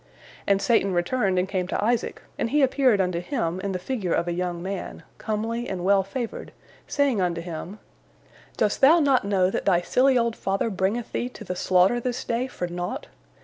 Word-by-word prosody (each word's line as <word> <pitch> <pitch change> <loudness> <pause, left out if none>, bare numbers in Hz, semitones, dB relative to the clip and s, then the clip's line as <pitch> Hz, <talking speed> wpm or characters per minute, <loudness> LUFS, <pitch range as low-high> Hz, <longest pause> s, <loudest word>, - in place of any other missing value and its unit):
And 200 -1 +3
Satan 210 -5 +2
returned 190 +2 +1
and 180 +1 +1
came 185 -2 -2
to 200 - -1
Isaac, 235 +1 -1
and - - -2
he 295 +2 +3
appeared 260 -5 +3
unto 180 -2 0
him 180 - -2
in 195 +1 -3
the 185 - -1
figure 185 -2 -2
of 170 - -1
a 175 - -1
young 175 0 -2
man, 195 0 -5 0.2
comely 225 +2 -2
and 185 -2 -4
well 200 0 +5
favored, 225 +5 -5 0.4
saying 275 -8 +1
unto 175 -2 0
him: 170 +3 -6 0.8
"Dost 210 - +1
thou 305 +6 +7
not 275 -7 +3
know 190 -2 +2
that - - -3
thy 175 -3 +3
silly 255 +7 +3
old 235 -1 +1
father 195 +3 -1
bringeth 195 +5 -1
thee 245 - -2
to 235 - -11
the 180 -3 -4
slaughter 185 +6 +3
this 250 +1 -3
day 240 +2 -1
for 180 - -4
naught? 175 0 -5
200 Hz, 195 wpm, -25 LUFS, 180-240 Hz, 0.8 s, thou